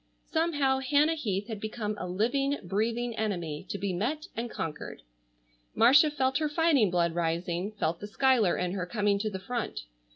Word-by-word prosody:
Somehow 290 Hz, -5 st, +1 dB
Hannah 290 Hz, +4 st, +3 dB
Heath 205 Hz, -10 st, -2 dB
had 220 Hz, -3 st, -5 dB
become 215 Hz, -1 st, -3 dB
a -, -, -4 dB
living, 250 Hz, +10 st, 0 dB
breathing 225 Hz, +5 st, -1 dB
enemy 175 Hz, -9 st, -3 dB
to -, -, -3 dB
be 195 Hz, -1 st, -2 dB
met 265 Hz, -, -2 dB
and 235 Hz, +1 st, -3 dB
conquered. 155 Hz, -7 st, -6 dB, 0.7 s
Marcia 275 Hz, +7 st, +6 dB
felt 265 Hz, -1 st, 0 dB
her 305 Hz, -1 st, 0 dB
fighting 295 Hz, -, +3 dB
blood 170 Hz, -1 st, +1 dB
rising, 170 Hz, +3 st, -2 dB
felt 165 Hz, -5 st, -1 dB
the 205 Hz, -, -6 dB
Schuyler 240 Hz, -4 st, +3 dB
in 180 Hz, -1 st, -1 dB
her 180 Hz, -2 st, -3 dB
coming 205 Hz, 0 st, +1 dB
to 215 Hz, +1 st, -1 dB
the 195 Hz, -, -5 dB
front. 235 Hz, +4 st, -4 dB
220 Hz, 170 wpm, -29 LUFS, 185-265 Hz, 0.7 s, Marcia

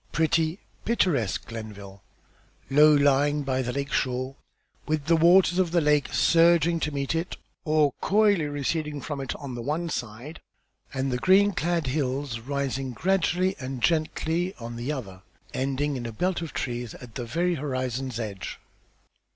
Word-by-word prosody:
Pretty, 160 Hz, +1 st, +1 dB, 0.3 s
picturesque 170 Hz, -, +1 dB
Glenville, 100 Hz, -4 st, -9 dB, 0.7 s
low 150 Hz, +2 st, +7 dB
lying 145 Hz, +1 st, +3 dB
by 130 Hz, -1 st, 0 dB
the 125 Hz, -1 st, -2 dB
lake 140 Hz, +2 st, -3 dB
shore, 130 Hz, 0 st, -1 dB, 0.5 s
with 155 Hz, -2 st, -1 dB
the 165 Hz, +1 st, +4 dB
waters 175 Hz, +2 st, +5 dB
of 185 Hz, -2 st, +2 dB
the 170 Hz, +1 st, +2 dB
lake 150 Hz, -3 st, +2 dB
surging 170 Hz, 0 st, +4 dB
to 150 Hz, -, -1 dB
meet 140 Hz, 0 st, -2 dB
it, 165 Hz, +2 st, -3 dB, 0.3 s
or 155 Hz, -2 st, +3 dB
coyly 205 Hz, -5 st, +3 dB
receding 145 Hz, +1 st, -2 dB
from 145 Hz, 0 st, -5 dB
it, 135 Hz, -, -4 dB
on 140 Hz, -4 st, -7 dB
the 120 Hz, -, -5 dB
one 155 Hz, +7 st, -2 dB
side, 125 Hz, +4 st, -6 dB, 0.5 s
and 135 Hz, 0 st, -2 dB
the 125 Hz, -, -1 dB
green 195 Hz, +7 st, +5 dB
clad 170 Hz, -3 st, -1 dB
hills 130 Hz, -2 st, -2 dB
rising 135 Hz, 0 st, -3 dB
gradually 185 Hz, +4 st, +1 dB
and 130 Hz, -2 st, -5 dB
gently 165 Hz, +4 st, 0 dB
on 120 Hz, 0 st, -7 dB
the 120 Hz, +5 st, -3 dB
other, 100 Hz, -10 st, -6 dB, 0.3 s
ending 140 Hz, +2 st, -1 dB
in 120 Hz, -2 st, -4 dB
a -, -, -5 dB
belt 180 Hz, +11 st, -1 dB
of 165 Hz, -, -5 dB
trees 120 Hz, -2 st, -4 dB
at 120 Hz, -3 st, -12 dB
the 125 Hz, -, -4 dB
very 170 Hz, +10 st, 0 dB
horizon's 130 Hz, -4 st, -3 dB
edge. 100 Hz, -4 st, -5 dB
145 Hz, 160 wpm, -26 LUFS, 130-165 Hz, 0.7 s, low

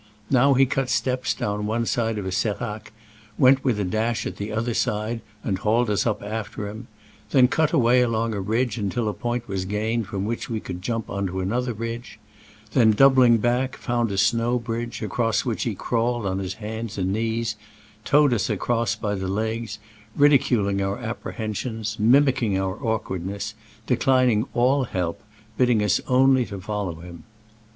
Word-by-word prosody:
Now 135 Hz, +1 st, +5 dB
he 135 Hz, +1 st, +5 dB
cut 130 Hz, 0 st, -1 dB
steps 125 Hz, +2 st, 0 dB
down 105 Hz, 0 st, -2 dB
one 115 Hz, +2 st, 0 dB
side 115 Hz, -2 st, 0 dB
of 100 Hz, -, -4 dB
a 95 Hz, -, -3 dB
serac, 105 Hz, +2 st, -3 dB, 0.5 s
went 135 Hz, +1 st, +5 dB
with 125 Hz, -6 st, +1 dB
a -, -, +1 dB
dash 110 Hz, +5 st, -1 dB
at -, -, -5 dB
the 105 Hz, +1 st, -4 dB
other 115 Hz, +2 st, -1 dB
side, 110 Hz, +2 st, -1 dB, 0.2 s
and 95 Hz, -3 st, -1 dB
hauled 110 Hz, +2 st, +1 dB
us 105 Hz, -, +1 dB
up 110 Hz, -, -1 dB
after 105 Hz, -1 st, -4 dB
him; 110 Hz, +3 st, -8 dB, 0.4 s
then 130 Hz, -3 st, +5 dB
cut 160 Hz, +4 st, +1 dB
away 125 Hz, -5 st, +4 dB
along 115 Hz, -1 st, 0 dB
a 100 Hz, -, -2 dB
ridge 115 Hz, +3 st, -1 dB
until 110 Hz, +3 st, -1 dB
a 105 Hz, -, -1 dB
point 120 Hz, +1 st, -3 dB
was 95 Hz, -2 st, -2 dB
gained 110 Hz, +2 st, -1 dB
from 100 Hz, -1 st, -3 dB
which 115 Hz, +2 st, -3 dB
we 115 Hz, -2 st, -2 dB
could 90 Hz, -3 st, -7 dB
jump 115 Hz, +2 st, -3 dB
on 100 Hz, 0 st, -2 dB
to 95 Hz, +1 st, -4 dB
another 120 Hz, +7 st, -1 dB
ridge; 115 Hz, 0 st, -6 dB, 0.5 s
then, 115 Hz, -4 st, +5 dB
doubling 130 Hz, -1 st, +6 dB
back, 125 Hz, +3 st, 0 dB
found 120 Hz, -2 st, -1 dB
a 100 Hz, -, -3 dB
snow 115 Hz, +5 st, +2 dB
bridge, 115 Hz, 0 st, -4 dB
across 115 Hz, +2 st, 0 dB
which -, -, -2 dB
he -, -, -2 dB
crawled 120 Hz, -1 st, -1 dB
on 95 Hz, 0 st, -1 dB
hands 105 Hz, +3 st, -5 dB
and 95 Hz, 0 st, 0 dB
knees, 115 Hz, 0 st, -1 dB, 0.5 s
towed 145 Hz, 0 st, +4 dB
us 110 Hz, -2 st, 0 dB
across 115 Hz, +2 st, 0 dB
by 105 Hz, -2 st, -2 dB
the 95 Hz, -1 st, -3 dB
legs, 110 Hz, +2 st, -2 dB, 0.4 s
ridiculing 120 Hz, -9 st, +3 dB
our 95 Hz, +1 st, -1 dB
apprehensions, 110 Hz, -1 st, -4 dB
mimicking 120 Hz, -3 st, +3 dB
our 95 Hz, +1 st, -3 dB
awkwardness, 100 Hz, -2 st, -3 dB, 0.3 s
declining 125 Hz, -2 st, +2 dB
all 130 Hz, +3 st, +3 dB
help, 90 Hz, -6 st, -3 dB, 0.4 s
bidding 120 Hz, -4 st, +3 dB
us 105 Hz, -, +2 dB
only 130 Hz, -1 st, +4 dB
to 100 Hz, -4 st, -7 dB
follow 95 Hz, -4 st, -4 dB
him. 85 Hz, -2 st, -11 dB
110 Hz, 175 wpm, -24 LUFS, 105-120 Hz, 0.5 s, doubling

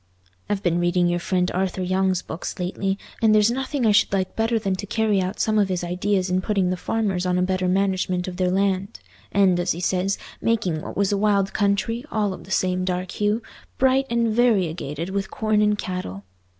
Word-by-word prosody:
I've 205 Hz, -1 st, -1 dB
been 175 Hz, -1 st, +1 dB
reading 175 Hz, 0 st, +2 dB
your 175 Hz, 0 st, 0 dB
friend 180 Hz, 0 st, 0 dB
Arthur 185 Hz, 0 st, -1 dB
Young's 185 Hz, 0 st, +1 dB
books 160 Hz, -, -6 dB
lately, 195 Hz, +2 st, -2 dB, 0.2 s
and 220 Hz, -1 st, +5 dB
there's 215 Hz, +2 st, +4 dB
nothing 265 Hz, 0 st, -2 dB
I 215 Hz, -, +5 dB
should 210 Hz, +2 st, +3 dB
like 190 Hz, -1 st, -1 dB
better 225 Hz, +1 st, +1 dB
than 195 Hz, -3 st, -1 dB
to 205 Hz, -, -6 dB
carry 215 Hz, -2 st, +1 dB
out 185 Hz, +2 st, -3 dB
some 215 Hz, -1 st, +2 dB
of 200 Hz, -2 st, +2 dB
his 180 Hz, -1 st, -1 dB
ideas 185 Hz, +2 st, 0 dB
in 185 Hz, 0 st, +1 dB
putting 190 Hz, -2 st, 0 dB
the -, -, 0 dB
farmers 195 Hz, -1 st, -1 dB
on 180 Hz, -1 st, +1 dB
a 180 Hz, -, +2 dB
better 185 Hz, 0 st, 0 dB
management 185 Hz, -1 st, 0 dB
of 180 Hz, -1 st, -6 dB
their 185 Hz, -1 st, +1 dB
land; 195 Hz, -, 0 dB, 0.3 s
and, 190 Hz, -3 st, +3 dB
as 175 Hz, -, +1 dB
he 170 Hz, -, -7 dB
says, 185 Hz, +2 st, 0 dB, 0.2 s
making 190 Hz, -9 st, 0 dB
what -, -, -7 dB
was 200 Hz, 0 st, +2 dB
a 200 Hz, -, +1 dB
wild 200 Hz, -2 st, +2 dB
country, 205 Hz, +4 st, 0 dB
all 210 Hz, -6 st, 0 dB
of -, -, -10 dB
the -, -, -15 dB
same 185 Hz, -1 st, 0 dB
dark 185 Hz, 0 st, -2 dB
hue, 210 Hz, +2 st, 0 dB, 0.3 s
bright 265 Hz, +1 st, +3 dB
and 235 Hz, -1 st, +1 dB
variegated 180 Hz, -, 0 dB
with 195 Hz, 0 st, -2 dB
corn 215 Hz, -1 st, +1 dB
and 210 Hz, 0 st, +2 dB
cattle. 180 Hz, -, -5 dB
190 Hz, 210 wpm, -23 LUFS, 180-210 Hz, 0.3 s, and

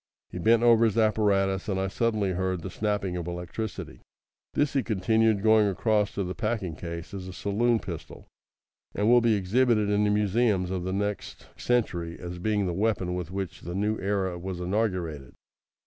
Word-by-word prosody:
He 90 Hz, -, -5 dB
bent 115 Hz, +5 st, +4 dB
over 115 Hz, -1 st, +6 dB
his 110 Hz, -1 st, 0 dB
apparatus, 100 Hz, -3 st, +2 dB
and 95 Hz, -1 st, 0 dB
I 95 Hz, -, 0 dB
suddenly 105 Hz, -1 st, 0 dB
heard 95 Hz, -1 st, -2 dB
the -, -, -5 dB
snapping 105 Hz, -4 st, -1 dB
of 85 Hz, -1 st, -5 dB
electricity. 90 Hz, +5 st, -6 dB, 0.5 s
"This," 145 Hz, -1 st, +1 dB
he 135 Hz, -, +2 dB
continued 110 Hz, -1 st, +1 dB
going 110 Hz, -1 st, +5 dB
across 105 Hz, +2 st, +1 dB
to 100 Hz, -, -1 dB
the 90 Hz, 0 st, -4 dB
packing 105 Hz, -7 st, -2 dB
case, 85 Hz, +3 st, -7 dB
"is 95 Hz, -2 st, -6 dB
a -, -, -6 dB
saloon 115 Hz, +5 st, +1 dB
pistol, 90 Hz, -6 st, -8 dB, 0.7 s
and 105 Hz, -, +1 dB
will 120 Hz, +1 st, +6 dB
be 115 Hz, -2 st, +3 dB
exhibited 105 Hz, +2 st, +2 dB
in 105 Hz, 0 st, +2 dB
the 105 Hz, -, +2 dB
museums 105 Hz, -2 st, +1 dB
of 90 Hz, -2 st, -3 dB
the 95 Hz, -, -2 dB
next 100 Hz, +1 st, -3 dB
century 85 Hz, -9 st, -1 dB
as 90 Hz, 0 st, -7 dB
being 105 Hz, +1 st, 0 dB
the 90 Hz, -, -1 dB
weapon 95 Hz, -2 st, 0 dB
with 90 Hz, -2 st, -4 dB
which 95 Hz, -3 st, -5 dB
the 85 Hz, +1 st, -6 dB
new 105 Hz, +2 st, 0 dB
era 95 Hz, -3 st, -1 dB
was 90 Hz, 0 st, -5 dB
inaugurated. 90 Hz, -, -2 dB
100 Hz, 180 wpm, -27 LUFS, 90-110 Hz, 0.7 s, over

